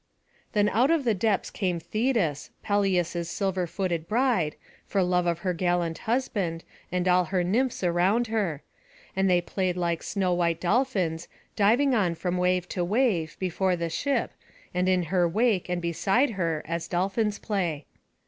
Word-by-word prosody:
Then 210 -1 +3
out 240 +7 +3
of 330 -3 +2
the 235 -3 +2
depths 205 0 0
came 180 -4 -1
Thetis, 215 - -1
Peleus's 180 -4 0
silver 190 -2 -1
footed 170 -3 -2
bride, 225 - +1 0.3
for 195 -2 +1
love 180 0 +1
of 170 0 -1
her 180 - +1
gallant 175 -1 0
husband, 200 -9 -1 0.3
and 180 0 0
all 180 0 +4
her 180 +1 0
nymphs 230 +6 0
around 180 +7 +2
her; 205 -10 -2 0.5
and 190 0 +2
they 180 -1 +4
played 180 0 -2
like 170 -2 -1
snow 190 -3 0
white 170 -2 +1
dolphins, 180 -5 0 0.3
diving 240 +7 +3
on 185 -7 +1
from 180 +2 -2
wave 180 0 +1
to 180 - -2
wave, 190 -5 +1
before 185 0 0
the 170 -1 -3
ship, 280 - 0 0.4
and 180 +1 +1
in 185 -1 +2
her 175 +1 +2
wake, 210 -1 +1
and 175 -1 -2
beside 195 - +1
her, 165 -6 -2
as 165 +1 -3
dolphins 200 +4 0
play. 175 -8 -2
180 Hz, 160 wpm, -26 LUFS, 170-210 Hz, 0.5 s, all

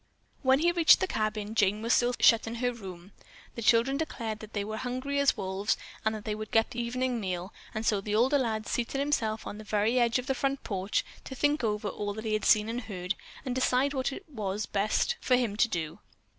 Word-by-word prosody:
When 265 -1 +4
he 340 +4 +3
reached 340 -2 +6
the - - +1
cabin, 215 - -2
Jane 210 0 +2
was 230 - +2
still 245 0 +3
shut 230 -1 +5
in 225 - -4
her 245 +1 0
room. 190 -4 -10 0.4
The 235 - -6
children 235 +5 +3
declared 230 -8 -4
that 215 0 -11
they 205 - -1
were 215 +1 -5
hungry 255 +4 -2
as 280 -3 +3
wolves 195 +1 -1 0.3
and 220 0 +1
that 210 - -8
they 215 - -1
would 215 0 -6
get 225 +2 +2
the 240 -1 -3
evening 250 +1 -1
meal, 185 -1 -4 0.2
and 220 +1 -2
so 205 -3 +2
the 210 +1 -2
older 260 +6 +4
lad 220 -4 -1
seated 240 +2 -2
himself 235 -6 0
on 210 - -6
the 215 0 -5
edge 235 +3 +3
of 250 - -4
the 270 - 0
front 275 +1 -1
porch 195 0 -1 0.2
to 265 - -7
think 290 +1 +1
over 210 -1 -1
all 205 0 -4
that 220 +1 -6
he 215 - -1
had 215 - 0
seen 215 0 +5
and 235 +2 -3
heard, 185 -4 -4 0.3
and 255 - -1
decide 260 +2 +2
what 260 0 -1
it 385 - -8
would 210 -8 -3
be - - -8
best 215 - +1
for 255 - +3
him 240 -5 0
to 220 - +3
do. 165 -6 -4
225 Hz, 235 wpm, -29 LUFS, 210-255 Hz, 0.4 s, reached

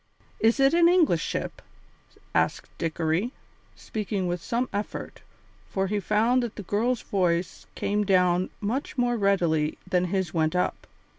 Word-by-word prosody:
"Is 225 +4 +3
it 270 +2 +5
an 340 0 +6
English 325 - +4
ship?" - - -4 0.7
asked - - 0
Dickory, 165 - -1 0.4
speaking 205 -3 -3
with 175 -1 -2
some 240 +6 -1
effort, 205 +1 -5 0.5
for 190 0 0
he 205 +2 -1
found 220 +6 +2
that 240 -3 -4
the 205 - -6
girl's 230 +6 0
voice 175 -3 -1
came 210 +1 0
down 180 -2 +3
much 245 +8 -2
more 245 -1 +2
readily 175 -8 +1
than 180 -1 +2
his 185 -2 -1
went 160 0 +1
up. 180 - -1
200 Hz, 145 wpm, -26 LUFS, 175-235 Hz, 0.7 s, an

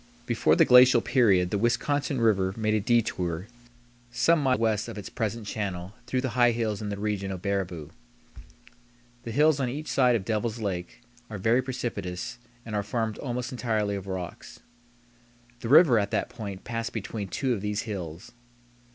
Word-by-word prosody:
Before - - +2
the - - +5
glacial 125 0 +7
period 100 -8 +3
the 100 - 0
Wisconsin 135 +4 0
River 100 -4 +2
made 110 -1 0
a 110 - +2
detour 100 -6 0 0.6
some 150 +7 +2
miles 130 -2 +2
west 110 -2 +1
of 115 - -7
its 105 - -7
present 110 0 -3
channel 95 -3 -4
through 130 - 0
the 130 - -2
high 120 -1 +4
hills 110 -3 -2
in 105 - -4
the 100 - -4
region 100 -2 -2
of 95 -2 -6
Baraboo. 95 -6 -3 1.3
The 115 - -4
hills 150 +4 +3
on 130 -2 0
each 150 +5 -5
side 125 -3 +3
of 100 -5 -2
Devil's 110 +1 -1
Lake 95 -5 -4 0.3
are 105 - -5
very 115 +6 +2
precipitous 120 -7 -5 0.3
and 110 - -7
are 105 - +1
formed 110 +1 -3
almost 125 -1 -3
entirely 110 -5 -1
of 100 -1 -5
rocks. 95 -2 -7 1.0
The 115 - -5
river 140 -5 +7
at 100 -1 -1
that 110 - -1
point 100 -4 -7
passed 115 +1 -4
between 105 -1 -4
two 130 +6 -1
of 105 - -3
these 105 +1 -2
hills. 90 -4 -6
110 Hz, 175 wpm, -27 LUFS, 100-120 Hz, 1.3 s, glacial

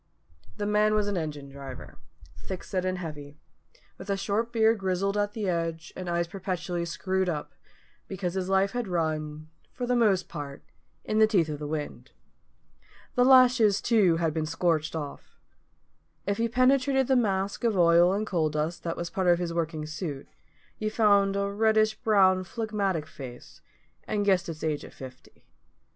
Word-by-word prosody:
_" - - -27
The 205 - -2
man 210 +1 +3
was 210 -1 +1
an 205 - -1
engine 150 -4 -4
driver, 135 -2 -10 0.4
thick 190 -2 -7
set 185 -2 -2
and 185 0 -1
heavy, 150 -4 -8 0.6
with 200 - -10
a 200 - +1
short 205 +4 -1
beard 225 -1 +3
grizzled 190 +1 -1
at 205 0 0
the 210 -3 -3
edge, 165 -2 -2
and 185 -1 -5
eyes 170 0 0
perpetually 180 -2 -3
screwed 185 +2 -1
up, 150 -3 -4 0.5
because 185 -2 -3
his 190 -1 -2
life 195 +1 +2
had 245 -3 -3
run 155 -3 -3 0.2
for 250 - -4
the 250 0 +1
most 205 -6 +2
part 140 -1 -7 0.4
in 215 - 0
the 220 - +7
teeth 180 -8 +2
of 150 -1 -4
the 150 - -5
wind. 150 -1 -5 1.0
The 245 - +3
lashes, 250 -5 +6
too, 205 -8 +3
had 165 -2 0
been 155 -1 -2
scorched 160 -2 0
off. 145 -3 -7 0.9
If 200 +2 -1
you 230 0 +1
penetrated 265 +2 +3
the 265 - +2
mask 200 -4 0
of 225 -4 +1
oil 170 +1 +5
and 205 +3 -1
coal 165 -6 0
dust 155 +3 -2
that 165 -1 -4
was 170 -1 -4
part 190 -2 -1
of 175 -1 +5
his 170 -1 -3
working 160 -2 -2
suit, 155 -3 -5 0.5
you 215 - -1
found 200 -3 +3
a 200 0 0
reddish 215 +1 +2
brown 195 -4 +3
phlegmatic 200 -5 -2
face, 135 -4 -11 0.5
and 205 -1 -1
guessed 190 -2 +2
its 160 -1 -7
age 155 -2 -1
at - - -11
fifty. 130 -1 -13
185 Hz, 175 wpm, -27 LUFS, 160-210 Hz, 1.0 s, the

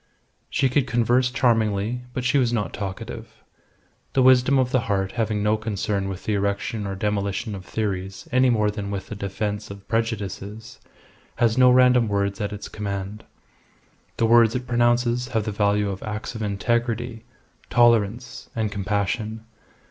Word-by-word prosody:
She 135 - +2
could 130 +1 +1
converse 120 +2 +2
charmingly, 115 -2 +1
but 125 0 -4
she 125 +3 +3
was 120 -3 +2
not 105 -4 -1
talkative. 95 -2 -7 0.7
The 130 - +3
wisdom 130 +1 +5
of 130 -1 +1
the 130 - +3
heart 95 -1 0
having 110 -2 -1
no 105 +1 +2
concern 100 -2 -2
with 95 -1 -6
the 110 - 0
erection 100 +1 -1
or 95 - -3
demolition 100 +2 -2
of 95 -2 -7
theories 95 -3 -4
any 130 0 +4
more 105 -3 +2
than 100 -1 -5
with 100 -1 -5
the - - -5
defence 105 +1 -3
of 100 0 -11
prejudices, 110 0 -3 0.6
has 115 -2 +2
no 125 0 +6
random 125 -2 +5
words 100 -1 -1
at 105 0 -2
its 105 0 -6
command. 100 0 -5 0.9
The 115 - +2
words 115 0 +5
it 125 0 -2
pronounces 120 0 +2
have 115 -4 -1
the 110 - -2
value 100 0 +1
of 95 - -6
acts 105 +2 -5
of 110 - -6
integrity, 115 +2 -1 0.5
tolerance, 120 -1 +2
and 110 -2 -1
compassion. 105 +2 -2
110 Hz, 160 wpm, -24 LUFS, 100-120 Hz, 0.9 s, no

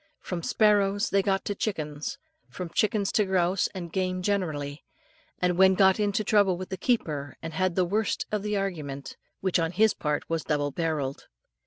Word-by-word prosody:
From 180 -2 -4
sparrows 205 +2 +2
they 195 - +4
got 195 0 0
to 205 - -1
chickens, 155 - -3 0.3
from 180 -2 -6
chickens 210 -2 +1
to 210 - +3
grouse 185 -1 +1
and 175 -3 -6
game 185 -1 -1
generally, 155 -8 -2 0.5
and 180 0 0
then 190 0 +6
got 190 +1 +5
into 205 0 +1
trouble 200 -4 +3
with 185 +1 -6
the 190 - -3
keeper, 150 - -1
and 165 0 -7
had 185 +1 0
the 185 - +3
worst 210 +4 0
of 210 -1 0
the 210 0 -1
argument, 150 -9 -4 0.3
which 190 -1 +1
on 165 0 0
his 220 +2 +4
part 150 -1 -2
was 165 -1 -1
double 145 -1 0
barrelled. 150 -4 -2
185 Hz, 180 wpm, -27 LUFS, 160-200 Hz, 0.5 s, then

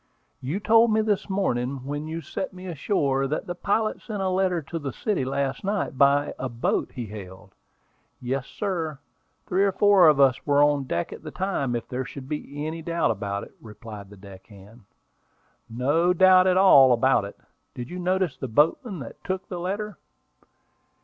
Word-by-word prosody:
"You 145 +10 -3
told 225 +2 +4
me 220 0 +3
this 210 -2 -1
morning, 130 -9 -1
when 145 +2 -4
you 165 +1 -5
set 185 +5 -5
me 185 0 -10
ashore, 140 -5 0
that 150 - -3
the 175 - -4
pilot 210 +4 -1
sent 215 -3 -6
a 190 - 0
letter 185 -1 +1
to 165 +4 -5
the 140 -3 -4
city 200 - -2
last 135 +1 -2
night 200 -6 -2
by 140 +1 +3
a 130 - -3
boat 115 0 -1
he 120 - -5
hailed." 100 -3 -11 0.7
"Yes, 130 +1 -3
sir; 165 -7 -3 0.5
three 190 +2 +1
or 200 - +3
four 195 -2 +5
of 150 -2 +5
us 135 -2 +4
were 145 0 +3
on 145 -2 +2
deck 85 -8 -3
at - - -10
the 155 - -8
time, 150 -8 -2
if 120 - -4
there 125 +1 -3
is - - -11
any 150 +3 -5
doubt 170 -6 0
about 100 -1 -3
it," - - -13
replied 105 -2 -10
the 105 - -14
deck 95 -1 -13
hand. 105 +2 -16 0.8
"No 145 +10 +1
doubt 185 0 +6
at 185 0 +3
all 140 -10 +7
about 125 -1 +3
it. 100 - -8 0.4
Did 120 +3 -7
you 180 - -5
notice 185 -3 0
the 130 - -5
boatman 165 - +1
that 115 - -10
took 185 0 -4
the 180 - -5
letter?" 205 +4 -4
150 Hz, 185 wpm, -25 LUFS, 125-185 Hz, 0.8 s, all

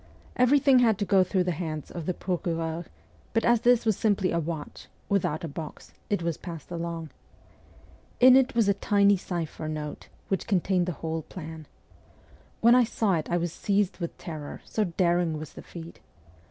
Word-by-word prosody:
Everything 265 +1 +5
had 225 -4 +4
to 205 - -1
go 195 -1 +4
through 185 0 +1
the 180 - 0
hands 155 -3 -5
of 170 -3 -6
the 180 - +1
procureur; 165 -2 -2 0.5
but 225 - +1
as 235 -1 +4
this 240 -1 +4
was 220 -2 +3
simply 200 -3 +1
a 170 - +1
watch, 160 -2 -6 0.2
without 175 -6 0
a - - -2
box, 155 +1 -8 0.2
it 200 -5 0
was 170 -2 -1
passed 165 -2 -8
along. 165 -2 -4 1.1
In 255 +1 +8
it 265 -2 +3
was 230 -3 +3
a 200 - +4
tiny 200 0 +3
cipher 170 -4 -4
note 155 -1 -5 0.2
which 195 - -2
contained 185 -3 +1
the - - 0
whole 160 0 -2
plan. 160 -1 -9 0.9
When 235 +1 +7
I 250 0 +6
saw 220 -3 0
it 160 -3 -1
I 175 - +2
was 170 -1 -2
seized 200 -2 0
with 170 -2 -5
terror, 155 -4 -7
so 215 - 0
daring 170 -2 +1
was 155 0 -8
the - - -9
feat. 170 -1 -10
175 Hz, 180 wpm, -27 LUFS, 165-205 Hz, 1.1 s, In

